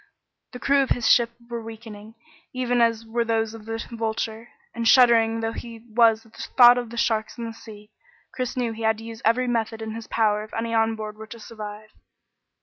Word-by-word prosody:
The - - -6
crew 275 +2 +3
of 270 - -1
his 240 -2 +1
ship 235 -1 +5 0.2
were 235 -1 -5
weakening, 220 -1 -10 0.4
even 245 -1 0
as 230 -1 +2
were 235 +1 -1
those 225 -1 -1
of 225 -2 -11
the 225 0 -4
Vulture, 225 0 -3 0.3
and 230 -1 -2
shuddering 230 -2 +5
though 225 0 -1
he 230 0 -9
was 225 -1 +4
at 225 - -22
the - - -10 0.2
thought 245 -1 +8
of 240 -2 -6
the 235 - -9
sharks 220 -2 0
in 235 - -5
the 225 - -6
sea, 215 -2 -13 0.4
Chris 255 0 -4
knew 240 -2 0
he 225 - -9
had 220 -1 +2
to 225 - -10
use 225 0 -9
every 245 +3 +2
method 225 -2 -1
in 220 0 -5
his 225 0 -8
power 210 -2 +1
if 215 - -11
any 230 0 -2
on 225 0 +2
board 215 -1 -7
were 220 0 -10
to 230 - -10
survive. 215 -1 -9
225 Hz, 220 wpm, -24 LUFS, 220-235 Hz, 0.4 s, thought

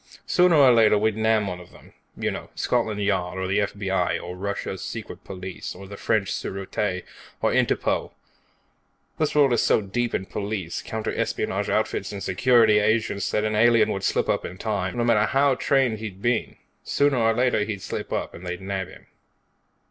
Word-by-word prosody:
Sooner 180 -2 +4
or 140 -4 +7
later 110 -2 +5
we'd 110 0 +1
nab 110 -1 +2
one 90 -1 -4
of 90 - -13
them. - - -17 0.2
You - - -1
know, - - -7
Scotland 110 -4 0
Yard, 95 -2 -1
or 95 - -2
the 100 +3 +1
F.B.I., 95 -3 -1
or 90 +1 -7
Russia's 95 -1 -4
secret 105 -4 -7
police, 95 -1 -7
or 95 +2 -10
the 100 - -8
French 100 -2 0
Sûreté, 95 -1 -3 0.4
or - - +1
Interpol. - - +1 1.1
This 155 -1 0
world 140 -4 +5
is 120 - +3
so - - +3
deep 115 +4 -2
in 95 - -2
police, 100 -4 -4
counter 110 -1 -4
espionage - - -1
outfits - - -1
and 100 -1 -6
security 110 +1 +4
agents 110 -1 0
that 105 - 0
an 110 0 0
alien 115 +1 +4
would 95 - -3
slip - - +1
up - - 0
in 90 - -7
time, 100 0 -2
no 120 - +1
matter 110 -3 +3
how 140 +1 +3
much 130 - -3 0.3
he'd 105 -4 -7
been 120 +2 +1
trained. - - -22 0.3
Sooner 140 -2 +2
or 115 -1 +2
later, 125 -3 +2
he'd 105 -3 -5
slip - - -5
up, - - -2
and 85 - -11
they'd 90 0 -4
nab 95 -1 -3
him." - - -15
105 Hz, 190 wpm, -24 LUFS, 95-115 Hz, 1.1 s, or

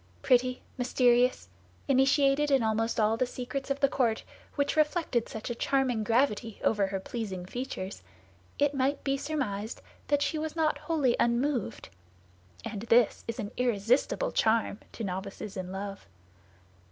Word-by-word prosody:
Pretty, 255 0 +2 0.2
mysterious, 250 - +3 0.4
initiated 275 +2 +3
in 270 -4 +3
almost 225 +1 0
all 220 +1 +3
the 255 - +1
secrets 265 +3 -5
of 275 0 -1
the 275 - +6
court, 235 -5 0 0.3
which 285 +1 0
reflected 305 -6 +1
such 220 +2 -5
a - - 0
charming 250 -2 +1
gravity 225 -2 +1
over 205 -3 +2
her 195 0 -3
pleasing 190 -4 -5
features, 200 -3 -5 0.6
it 290 0 +2
might 275 +1 0
be 275 0 +1
surmised 260 -8 -3 0.3
that 290 0 +2
she 315 - -1
was 315 0 -4
not 315 -2 +1
wholly 300 -5 +1
unmoved; 240 - 0 0.8
and 210 -3 -5
this 235 -1 +4
is 230 - -3
an 210 -3 -4
irresistible 250 - +1
charm 220 -1 +1
to 230 - -6
novices 195 +1 -5
in 185 -1 -5
love. 195 +1 -6
245 Hz, 145 wpm, -29 LUFS, 215-275 Hz, 0.8 s, the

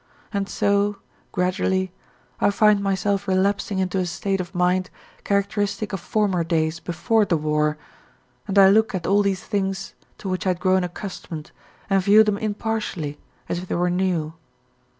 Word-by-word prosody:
And 200 -1 -1
so, 200 0 +1 0.3
gradually, 185 +1 0 0.5
I - - +4
find 210 0 +4
myself 195 +1 0
relapsing 195 +1 +1
into 190 0 0
a 180 - 0
state 195 +2 -1
of 180 +1 -9
mind 180 +1 +1 0.3
characteristic 205 +1 -1
of 195 - -2
former 190 -1 0
days 160 -1 0
before 210 +7 +1
the 175 -5 +1
war, 150 0 0 0.7
and 200 - -1
I 195 -1 +8
look 220 0 +3
at 175 -2 -3
all 200 +2 +4
these 195 -2 -1
things 195 -2 -2 0.2
to - - -7
which 185 0 -2
I 180 -1 +2
had - - -25
grown 185 -1 +2
accustomed 175 -3 -7 0.4
and 195 -1 +3
view 205 +3 +6
them 210 -1 0
impartially, 210 -8 -3 0.3
as 175 - -2
if 185 - -8
they - - -2
were 175 +1 +1
new. 175 -4 0
190 Hz, 165 wpm, -23 LUFS, 180-200 Hz, 0.7 s, I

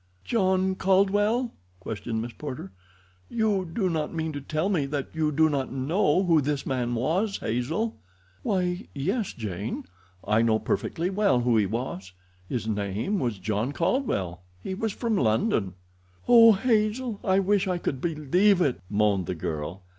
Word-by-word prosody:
"John 190 -4 +2
Caldwell?" 205 +6 +2 0.3
questioned 110 +3 -4
Miss 120 0 -7
Porter. 130 -10 -7 0.6
"You 210 -6 0
do 190 +2 0
not 160 -4 -1
mean 160 -1 -2
to 145 - -5
tell 155 +5 -1
me 165 -9 +1
that 140 -1 -3
you 155 -1 0
do 160 +2 +4
not 140 -3 -1
know 150 +7 +1
who 165 -4 +4
this 145 0 -2
man 120 -2 -1
was, 175 - 0
Hazel?" 145 - -2 0.4
"Why, 180 -1 -1
yes, 190 - -1
Jane; 105 -1 -4 0.4
I 110 +1 +3
know 115 -1 +3
perfectly 170 - -2
well 195 -10 +2
who 120 -1 +2
he 105 -3 +3
was—his 95 -1 -6
name 105 - -1
was 120 -6 -1
John 110 +7 -2
Caldwell; 120 - -1 0.2
he 190 - -3
was 220 +3 -2
from 230 +1 -1
London." 110 - +1 0.5
"Oh, 230 -2 +8
Hazel, 220 +1 0
I 190 -1 +3
wish 195 0 +2
I 180 -1 0
could 135 -6 -3
believe 175 +5 +2
it," 135 - +1
moaned 100 -3 +1
the 90 - -2
girl. 80 +3 -4
155 Hz, 155 wpm, -26 LUFS, -, 0.6 s, Oh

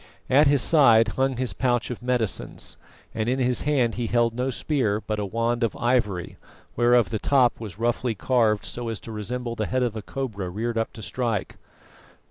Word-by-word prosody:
At 145 +3 +6
his 140 -3 +3
side 115 -8 +5
hung 135 +3 0
his 130 -1 -2
pouch 125 -1 0
of 120 - -6
medicines, 120 -6 -2 0.4
and 110 +1 -1
in 130 - +1
his 125 -1 +1
hand 130 -6 +1
he 120 +1 -3
held 120 0 +2
no 125 +2 -1
spear, 125 -6 0
but 110 -1 -4
a 100 - -2
wand 115 +3 -1
of 115 - -1
ivory, 120 -7 0 0.4
whereof 120 -1 +3
the 110 - -1
top 130 -2 +3
was 105 -5 -8
roughly 120 0 0
carved 110 -1 +1
so 120 -1 -4
as 110 -3 -4
to 115 - -9
resemble 115 +3 -4
the 110 -2 -2
head 130 0 0
of 120 -3 -1
a 110 - -4
cobra 105 -6 -5
reared 115 +5 -3
up 115 - -2
to 110 - -10
strike. 110 0 -2
120 Hz, 195 wpm, -25 LUFS, 110-125 Hz, 0.4 s, At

